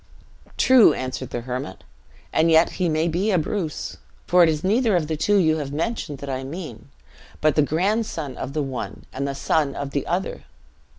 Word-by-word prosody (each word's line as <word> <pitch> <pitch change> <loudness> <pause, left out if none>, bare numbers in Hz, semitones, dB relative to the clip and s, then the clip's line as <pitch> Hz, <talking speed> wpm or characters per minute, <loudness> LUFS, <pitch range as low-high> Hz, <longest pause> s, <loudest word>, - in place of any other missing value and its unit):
"True," 255 -3 +6
answered 130 0 -4
the 120 - -4
hermit; 125 -5 -5 0.5
"and 165 +1 +3
yet 160 +1 +5
he 175 - +2
may 155 +1 +1
be 175 +6 0
a 190 - +3
Bruce. 165 -1 -3 0.3
For 180 +1 +4
it 170 - +6
is 155 -1 -1
neither 220 +2 +2
of 170 -3 +1
the 155 +1 -2
two 205 +7 +1
you 160 -4 +3
have 145 -3 -4
mentioned 155 -2 -3
that 140 - -8
I 130 -1 -3
mean; 140 - -8 0.5
but 155 -1 +3
the 150 - +3
grandson 165 - -1
of 135 - -6
the 150 -1 0
one, 125 -7 -6
and 140 +2 -2
the 140 - -3
son 140 0 0
of 140 -1 -4
the 140 - -2
other. 180 +3 -2
155 Hz, 195 wpm, -23 LUFS, 140-180 Hz, 0.5 s, True